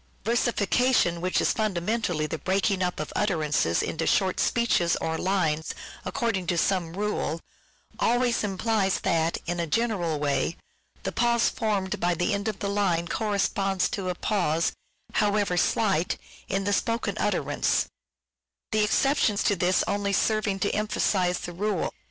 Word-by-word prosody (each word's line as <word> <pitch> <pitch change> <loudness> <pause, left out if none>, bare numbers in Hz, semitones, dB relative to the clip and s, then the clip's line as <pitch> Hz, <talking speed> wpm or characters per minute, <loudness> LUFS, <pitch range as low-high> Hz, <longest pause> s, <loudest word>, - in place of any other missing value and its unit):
Versification, 230 -4 +2
which 185 +1 +1
is - - +2
fundamentally 190 -4 -1
the 155 +1 -4
breaking 195 0 +1
up 180 -1 -1
of 155 - -5
utterances 155 - +1
into 165 +1 -2
short 190 -2 +2
pieces, 230 -8 +2
or 160 - -2
lines, 160 -4 0 0.3
according 225 -8 -1
to 175 - +1
some 175 -3 0
rule, 195 -5 -2 0.6
always 240 0 +2
implies 200 0 0
that, 165 0 +1
in 175 0 -2
a 170 - -1
general 190 -5 0
way, 145 +3 0 0.5
the - - -2
pause 235 -1 +2
formed 210 -3 -1
by 175 -1 +1
the 175 +4 0
end 200 +1 -2
of 215 -3 -2
the 200 - -3
line 190 -4 +1
corresponds 195 -2 0
to 190 -3 -3
a 180 - -2
pause, 170 -6 0 0.4
however 205 -3 +1
slight, 190 -1 +1 0.3
in 195 0 0
the 205 +1 0
spoken 230 +3 0
utterance; - - +1 0.9
the 215 0 +3
exceptions 220 -1 +2
to 205 - +2
this 180 +1 +2
only 200 0 -1
serving 215 -2 +1
to 200 +1 0
emphasize 190 -4 0
the 175 - -6
rule 200 0 -1
195 Hz, 145 wpm, -26 LUFS, 175-215 Hz, 0.9 s, the